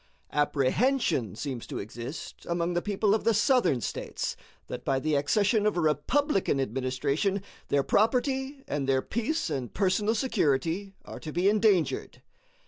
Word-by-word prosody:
Apprehension 150 - +1
seems 130 -1 -5
to - - -5
exist 120 +8 -7
among 170 0 0
the 175 - 0
people 205 +1 +1
of 220 - +1
the 230 -1 +3
Southern 205 - +3
States - - -3 0.3
that - - -6
by 135 -1 +1
the 155 +3 -1
accession 205 - +2
of 210 - 0
a - - +2
Republican 175 - +1
administration 135 - -1 0.2
their 140 -1 +2
property 265 - +1
and 140 -2 -2
their 130 -1 +2
peace 235 - -2
and 130 -5 -4
personal 205 +3 +2
security 195 - 0
are - - -8
to 155 - -7
be 175 +4 +1
endangered. 205 -4 +2
175 Hz, 145 wpm, -28 LUFS, 140-215 Hz, 0.3 s, the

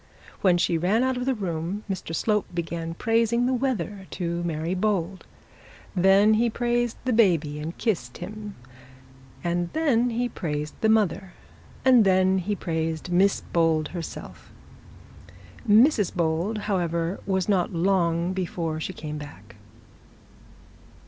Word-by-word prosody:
When 180 -3 +4
she 170 -1 +1
ran 200 +8 +2
out 260 0 +1
of 250 +1 -3
the 265 - +2
room, 180 0 -3
Mr 185 -4 -4
Slope 210 +4 0
began 165 -1 -4
praising 230 +3 +1
the 260 - +1
weather 210 -7 -2
to 170 -1 -3
Mary 165 0 -2
Bold, 190 -2 -1 0.7
then 195 +3 +5
he 230 +2 +2
praised 240 0 -1
the 255 - +1
baby 165 -10 +2
and 160 +3 -6
kissed 145 - -2
him, 210 +2 -7 0.9
and 175 0 -1
then 255 -7 +2
he 240 +1 -1
praised 150 -8 -4
the 220 - +3
mother, 200 -4 +1 0.5
and 255 -3 +7
then 190 0 +3
he 205 +3 -2
praised 160 -1 -3
Miss 195 +3 +3
Bold 160 -2 +1
herself. 170 -2 -8 1.2
Mrs 215 - +5
Bold, 170 +5 0
however, 170 -2 -1
was 190 -2 0
not 190 -4 +1
long 175 -1 +1
before 170 -4 -3
she 185 - -4
came 150 -2 -6
back. 145 0 -11
185 Hz, 135 wpm, -25 LUFS, 170-215 Hz, 1.2 s, and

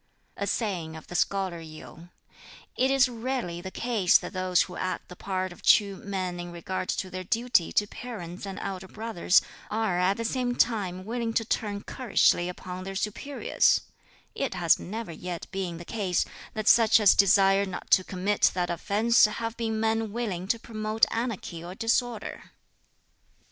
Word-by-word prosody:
A 200 - -3
saying 180 -7 -2
of 160 - -10
the - - -10
Scholar 190 -1 0
Yu: 160 +1 -11 0.7
"It 260 - +2
is 270 -1 +5
rarely 235 -7 -3
the 190 - -6
case 215 -4 +3
that - - -8
those 185 -1 +2
who 180 - -9
act 185 - -3
the 180 - -9
part 185 0 -3
of - - -17
true 200 -2 +4
men 185 -3 -4
in 175 0 -6
regard 180 +2 -4
to 185 - -2
their 185 0 -5
duty 230 -3 +1
to 205 - +3
parents 200 -5 -7
and 195 - -6
elder 190 -1 -5
brothers 215 -3 +2 0.3
are 215 -5 0
at 185 +2 +2
the 230 - -3
same 245 +1 -1
time 190 -7 0
willing 230 0 -2
to 225 - +1
turn 205 -2 -2
currishly 195 -7 +2
upon 180 0 -7
their 195 +1 -6
superiors: 215 +8 +1 0.5
it 270 -8 -2
has 175 -3 +3
never 220 +1 -6
yet 175 +1 -6
been 185 -3 -3
the 170 - -9
case 195 -5 0 0.3
that 215 -1 -3
such 225 -1 +6
as 205 -3 +7
desire 195 0 +4
not 185 - -7
to 185 - +6
commit 195 +3 +1
that 175 -1 0
offence 210 +7 +3
have 225 +2 -3
been 225 -2 -2
men 225 -1 0
willing 200 -6 -3
to 230 - +1
promote 215 -1 0
anarchy 225 -8 -3
or 180 +2 -8
disorder. 230 +1 -2
200 Hz, 170 wpm, -27 LUFS, 180-225 Hz, 0.7 s, as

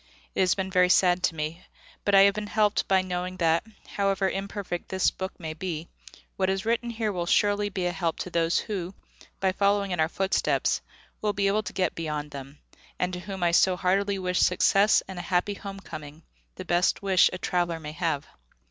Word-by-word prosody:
It - - -4
has 185 -2 +3
been 190 -1 -3
very 180 -1 +4
sad 180 0 +4
to 165 - -1
me, 155 +3 -4 0.4
but 205 - +3
I 195 - +9
have 200 0 +6
been 210 0 -4
helped 210 -1 +1
by 190 -1 +3
knowing 180 0 -4
that, 165 -1 +2 0.2
however 195 -1 0
imperfect 195 -2 -4
this 190 -1 +2
book 190 0 -6
may 160 -2 -5
be, 165 -1 -5 0.5
what 190 -1 +1
is 190 +1 -1
written 235 +1 0
here 225 -2 -2
will 175 -3 -3
surely 205 +2 +2
be 185 -2 -3
a 175 - +1
help 170 -2 -2
to 180 - -6
those 165 0 +2
who, 190 -3 -3 0.4
by 190 -1 +2
following 200 0 +1
in 180 - -2
our 160 0 +2
footsteps, 195 +2 0 0.4
will 210 -1 0
be 200 0 0
able 200 +2 +2
to - - -7
get 185 - 0
beyond 150 -2 -4
them, 140 +1 -9 0.4
and 180 0 -1
to 180 - -4
whom 190 0 -6
I 170 - +3
so 185 +2 +4
heartily 195 +2 +1
wish 180 -1 -1
success 195 +3 +4
and 190 -2 -7
a - - -2
Happy 180 +3 0
Home 195 -1 -8
coming, 155 -3 -10 0.3
the 185 - -8
best 175 +3 +1
wish 190 -2 +5
a - - -4
traveller 175 -2 -1
may 150 -1 -7
have. 155 -3 -2
185 Hz, 210 wpm, -27 LUFS, 170-195 Hz, 0.5 s, I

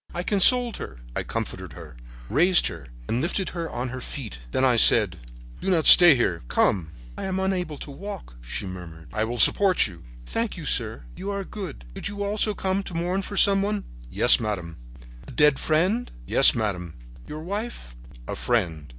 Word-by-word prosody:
"I 175 - -3
consoled 235 +5 +3
her, 60 -2 -9
I - - -1
comforted 90 -5 -6
her, 80 -4 -12 0.3
raised 175 +7 +4
her 80 -5 -10 0.2
and 120 +3 -1
lifted 185 +4 -2
her 170 -2 -5
on 125 +1 -4
her 130 +1 -7
feet. 115 - -8
Then 130 - 0
I 125 -2 +3
said: 115 - +6 0.4
"'Do - - -3
not 165 -4 +1
stay 175 -4 +10
here. 90 -9 -1
Come.' 85 +3 0 0.3
"'I - - -5
am 190 0 -2
unable 180 -5 -2
to 145 - -9
walk,' 195 - -9
she - - -5
murmured. 85 -4 -10
"'I 110 +1 0
will 120 +2 -5
support 190 +7 +4
you.' 90 -5 -9 0.2
"'Thank - - -3
you, - - -8
sir; - - 0
you 195 - -6
are 200 -1 -3
good. 185 - -8
Did - - -6
you 205 0 -5
also 210 +1 0
come 190 +1 -2
to 190 -3 -9
mourn 175 +3 -1
for 200 +1 -7
some 195 0 +4
one?' 205 0 -2 0.3
"'Yes, - - +4
madame.' 90 -7 -5 0.5
"'A - - -10
dead 150 +1 +3
friend?' 185 +10 0 0.2
"'Yes, - - +6
madame.' 90 -7 -3 0.3
"'Your 155 +1 -7
wife?' 200 - -6 0.3
"'A - - -4
friend.' 85 -11 -2
150 Hz, 185 wpm, -24 LUFS, -, 0.5 s, stay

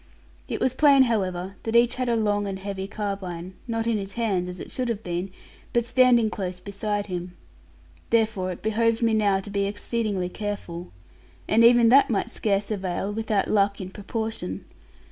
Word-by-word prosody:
It - - -3
was 255 - +1
plain, 275 -1 +6
however, 190 -5 -1
that 225 0 -3
each 235 0 +5
had 255 -1 -2
a 235 - +2
long 205 -2 +1
and 195 -1 -3
heavy 195 0 -5
carbine, 190 -4 -5
not 225 -1 -1
in 230 -2 +1
his 195 0 -6
hands 195 -6 -1
(as 180 - -7
it - - -8
should 250 -2 -2
have 220 -2 -3
been), 175 +2 -3 0.4
but 235 -1 +2
standing 240 -3 +4
close 185 -3 -4
beside 205 +2 -3
him. 180 -2 -6 0.7
Therefore 215 -5 +1
it 175 - -9
behoved 230 +1 +1
me 225 -1 +3
now 205 -3 +3
to 205 - -9
be 200 0 0
exceedingly 205 -2 -2
careful, 180 -3 -5 0.6
and 225 +2 +4
even 235 -1 +7
that 275 +3 +6
might 210 -5 -1
scarce 200 0 -1
avail, 195 0 -2
without 215 -2 0
luck 200 -1 +2
in 185 -1 -6
proportion. 210 - -5
205 Hz, 180 wpm, -25 LUFS, 190-230 Hz, 0.7 s, even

